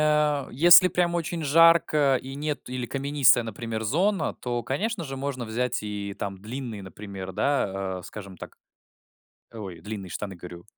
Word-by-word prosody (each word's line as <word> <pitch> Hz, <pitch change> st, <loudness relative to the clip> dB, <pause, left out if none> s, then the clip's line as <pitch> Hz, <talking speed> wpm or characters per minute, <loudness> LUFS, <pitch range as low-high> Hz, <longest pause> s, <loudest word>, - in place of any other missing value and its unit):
а, 150 Hz, -2 st, +2 dB
если 175 Hz, +6 st, +8 dB
прям 175 Hz, -1 st, 0 dB
очень 170 Hz, 0 st, -2 dB
жарко 155 Hz, -3 st, +5 dB
и 135 Hz, +1 st, -8 dB
нет 150 Hz, +1 st, -3 dB
или 125 Hz, -1 st, -4 dB
каменистая, 135 Hz, -3 st, +3 dB
например, 110 Hz, 0 st, -5 dB
зона, 170 Hz, -, +1 dB
то, 120 Hz, -1 st, -3 dB
конечно 200 Hz, -, -2 dB
же, 135 Hz, -1 st, -6 dB
можно 135 Hz, -3 st, -4 dB
взять 120 Hz, +1 st, -2 dB
и 100 Hz, -1 st, -5 dB
там 100 Hz, -1 st, -4 dB
длинные, 115 Hz, -2 st, -6 dB
например, 95 Hz, 0 st, -8 dB
да, 95 Hz, -8 st, -1 dB
э, -, -, -14 dB
скажем 100 Hz, -3 st, -9 dB
так, -, -, -11 dB, 1.0 s
ой, 95 Hz, -7 st, -8 dB
длинные 100 Hz, -2 st, -7 dB
штаны, 95 Hz, +2 st, -5 dB
говорю. 85 Hz, 0 st, -10 dB
125 Hz, 155 wpm, -26 LUFS, 100-150 Hz, 1.0 s, если